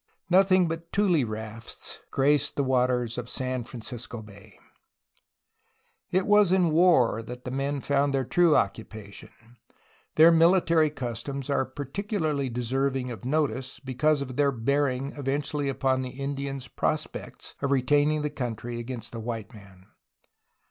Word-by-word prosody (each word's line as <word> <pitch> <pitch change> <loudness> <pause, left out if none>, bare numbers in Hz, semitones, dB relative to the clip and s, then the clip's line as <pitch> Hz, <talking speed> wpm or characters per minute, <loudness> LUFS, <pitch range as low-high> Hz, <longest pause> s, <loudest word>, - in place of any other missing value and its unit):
Nothing 185 -1 +5
but 165 +1 -5
tule 185 -8 +3
rafts 110 +1 -6
graced 145 +2 +2
the 140 - +1
waters 125 -2 +1
of 125 0 -6
San 130 -1 -2
Francisco 120 -1 -7
Bay. 100 -2 -15 1.5
It 185 +1 +1
was 210 -3 +5
in 180 -3 +3
war 155 -9 +4
that 125 +2 -9
the 125 - -4
men 140 +1 -2
found 140 +1 +1
their 135 -1 0
true 170 +3 +4
occupation. 105 0 -3 0.9
Their 160 +2 +8
military 165 -1 +4
customs 135 +1 -5
are 135 - +1
particularly 145 - -2
deserving 130 +2 -1
.of 120 +1 -8
notice 135 -3 -1
because 140 +3 +1
of 130 -2 -8
their 145 -1 +3
bearing 135 +2 0
eventually 140 +1 -2
upon 130 -1 0
the 130 - -4
Indians' 140 0 -4
pros - - 0
pects - - -9
of 140 - 0
retaining 145 +3 +2
the 150 - -2
country 120 -3 -4
against 120 -1 -6
the 115 - -6
white 115 0 -5
man. 100 -3 -15
135 Hz, 140 wpm, -27 LUFS, 120-150 Hz, 1.5 s, Their